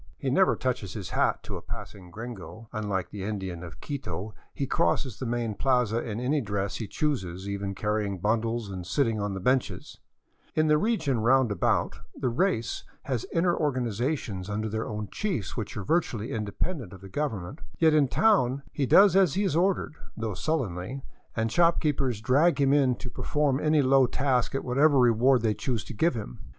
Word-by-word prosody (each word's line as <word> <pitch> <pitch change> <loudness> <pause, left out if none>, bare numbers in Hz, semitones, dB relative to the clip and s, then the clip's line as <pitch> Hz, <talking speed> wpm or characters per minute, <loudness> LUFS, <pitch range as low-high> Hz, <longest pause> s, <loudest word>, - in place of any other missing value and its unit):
He - - -2
never - - +4
touches - - -2
his - - -6
hat - - +1
to - - -5
a - - -9
passing 95 -4 -9
gringo; 110 +2 -8
unlike 105 -4 -2
the 100 - -6
Indian 95 -4 -4
of 85 -6 -9
Quito 105 - -5 0.2
he 140 - -3
crosses 115 +2 0
the 130 - -3
main 120 -2 -1
plaza 125 -1 +1
in 110 -1 -4
any 140 +4 +1
dress 100 -3 -2
he 110 - -4
chooses, 95 - -2
even 100 -1 -3
carrying 105 -1 -1
bundles 110 +2 -1
and 90 -2 -5
sitting 115 -2 +1
on 100 -1 -2
the - - -4
benches; 125 +6 -1 0.6
in 155 - +3
the 150 -1 +4
region 160 - +1
roundabout, 120 -4 +2 0.2
the 125 - -1
race 120 - 0 0.2
has 125 -5 -2
inner 175 +1 +2
organizations 120 - -2
under 105 +1 -2
their 110 +1 -3
own 105 -1 -4
chiefs 185 - -2
which 110 -2 -5
are 100 - -3
virtually 120 - 0
independent 110 - -3
of 95 - -12
the 100 - -10
Gov 145 +5 -1
ernment; 100 - -7 0.2
yet 160 -2 +4
in 150 -3 +4
town 140 - +3
he 140 -3 -1
does 195 +3 +7
as 190 -7 +4
he 200 - +1
is 185 -6 0
ordered, 180 -2 +1 0.2
though 110 -2 -2
sullenly, 130 - -2 0.3
and 110 0 0
shop 170 +2 +4
keepers 135 -7 0
drag 145 +8 +3
him 140 0 +4
in 135 -4 +3
to 125 - -8
perform 145 -3 0
any 150 -1 +3
low 135 0 +5
task 130 -1 0
at 135 - -2
whatever 140 +4 +4
reward 125 0 +4
they 110 -2 +2
choose 110 +1 -2
to - - -8
give 160 +6 +2
him. 105 - -6
120 Hz, 185 wpm, -27 LUFS, 105-145 Hz, 0.6 s, does